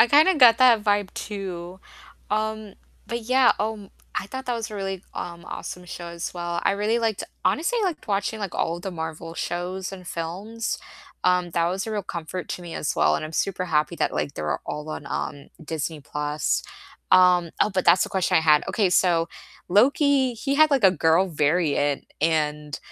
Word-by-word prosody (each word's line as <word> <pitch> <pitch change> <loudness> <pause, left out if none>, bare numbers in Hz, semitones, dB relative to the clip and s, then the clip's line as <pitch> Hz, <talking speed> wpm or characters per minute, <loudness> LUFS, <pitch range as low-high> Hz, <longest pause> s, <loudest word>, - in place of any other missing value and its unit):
I 235 - +8
kinda 310 +8 +5
got 235 -3 +8
that 240 -5 +5
vibe 205 -2 +1
too, 185 -3 -6 0.5
um, 215 -1 -2 0.3
but 235 0 -4
yeah, 255 +2 +4
um, 210 -2 -3 0.2
I 195 - -2
thought 260 +5 -7
that 245 - 0
was 230 -1 -4
a 210 - -7
really, 195 -1 -4
um, 170 -1 -6
awesome 180 - -7
show 175 0 -7
as 170 0 -5
well, 175 -1 -3
I - - +3
really 210 +3 +1
liked 225 -3 -1 0.2
honestly 350 +11 +1
liked 360 -6 -2
watching, 205 +2 -1
like, 200 -3 -5
all 165 - 0
of 175 - -11
the 195 - -4
Marvel 165 -1 -6
shows 180 +2 -3
and 185 -2 -10
films, 195 +8 -4 0.5
um, 180 -1 +2
that 170 0 +1
was 190 +5 -3
a - - -4
real 210 -2 -1
comfort 170 0 -6
to 180 - -4
me 170 -1 -8
as - - -2
well, 75 0 +4
and - - -4
I'm 155 - -7
super 185 +2 -1
happy 155 +1 +1
that, - - 0
like, 140 - -2
they're 75 -1 -2
all 150 +1 -5
on, 150 - -6
um, 140 0 -4 0.2
Disney+, 155 -1 -4 1.1
um 180 -2 +5
oh, - - +4
but 185 -2 -1
that's 170 +2 +6
the - - -6
question 190 -3 +1
I - - +5
had, 155 -2 +5
okay, 205 -5 +1
so 175 -2 +3 0.4
Loki, 265 - +3
he 275 +5 -2
had 310 +1 +5
like 270 -6 +2
a 190 - +8
girl 165 +2 +3
variant, 150 -2 +1
and 150 -1 0
185 Hz, 195 wpm, -24 LUFS, 165-215 Hz, 1.1 s, I